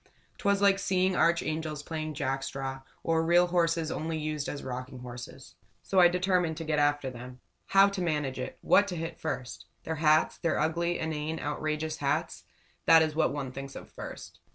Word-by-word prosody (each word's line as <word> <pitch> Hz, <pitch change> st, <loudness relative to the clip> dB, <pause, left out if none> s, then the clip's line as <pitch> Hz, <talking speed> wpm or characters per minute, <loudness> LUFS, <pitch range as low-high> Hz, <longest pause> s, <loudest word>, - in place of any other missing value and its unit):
'Twas 200 Hz, 0 st, +2 dB
like 195 Hz, -1 st, +5 dB
seeing 185 Hz, -1 st, +1 dB
archangels 155 Hz, -3 st, 0 dB
playing 155 Hz, -1 st, -4 dB
jackstraws 135 Hz, 0 st, -3 dB, 0.2 s
or 165 Hz, 0 st, +2 dB
real 175 Hz, +2 st, +5 dB
horses 165 Hz, -2 st, +1 dB
only 160 Hz, +1 st, -2 dB
used 155 Hz, -2 st, -3 dB
as 145 Hz, -, -5 dB
rocking 130 Hz, +1 st, -6 dB
horses. 120 Hz, -1 st, -9 dB, 0.3 s
So 190 Hz, -, +2 dB
I 175 Hz, -, +9 dB
determined 180 Hz, -2 st, +1 dB
to 165 Hz, -, -4 dB
get 155 Hz, -1 st, 0 dB
after 145 Hz, -2 st, +1 dB
them. 125 Hz, +1 st, -10 dB, 0.3 s
How 195 Hz, 0 st, +6 dB
to 200 Hz, -2 st, -4 dB
manage 150 Hz, -6 st, -1 dB
it! 130 Hz, -, -5 dB
What 205 Hz, -, +4 dB
to 180 Hz, -, -4 dB
hit 165 Hz, 0 st, -5 dB
first! 100 Hz, -, -5 dB, 0.2 s
Their 160 Hz, 0 st, -3 dB
hats, 155 Hz, 0 st, +3 dB
their 165 Hz, -3 st, 0 dB
ugly, 170 Hz, +3 st, 0 dB
inane, 160 Hz, 0 st, -3 dB
outrageous 155 Hz, +1 st, -2 dB
hats 145 Hz, +3 st, -2 dB, 0.4 s
that 160 Hz, 0 st, +8 dB
is 155 Hz, -1 st, -1 dB
what 160 Hz, -, +2 dB
one 140 Hz, -2 st, -4 dB
thinks 135 Hz, +1 st, -8 dB
of -, -, -10 dB
first. -, -, -9 dB
155 Hz, 175 wpm, -29 LUFS, 140-170 Hz, 0.4 s, I